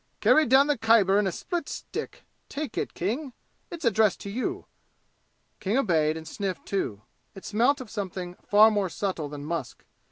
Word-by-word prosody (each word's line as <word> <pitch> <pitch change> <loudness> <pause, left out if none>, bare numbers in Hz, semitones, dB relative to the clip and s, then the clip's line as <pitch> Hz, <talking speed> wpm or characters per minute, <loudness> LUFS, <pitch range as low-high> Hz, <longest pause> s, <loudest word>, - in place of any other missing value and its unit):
"Carried 310 -5 +4
down 265 +2 +6
the 295 -4 0
Khyber 215 -3 +4
in 205 - +1
a - - 0
split 340 - -4
stick! - - -6 0.3
Take 290 -5 -5
it, - - -3
King 245 - -3 0.4
it's 340 -6 -7
addressed 215 -2 +3
to 200 - -6
you." 360 - -3 0.9
King 210 +4 0
obeyed 160 - +2
and 160 0 -9
sniffed 190 +1 -4
too. 105 - -3 0.3
It 195 - -11
smelt 245 +7 +2
of 255 -5 -9
something 185 -4 -5
far 215 +2 +6
more 205 -3 0
subtle 170 -4 -3
than 145 0 -7
musk. 160 -5 -5
205 Hz, 170 wpm, -27 LUFS, 180-255 Hz, 0.9 s, down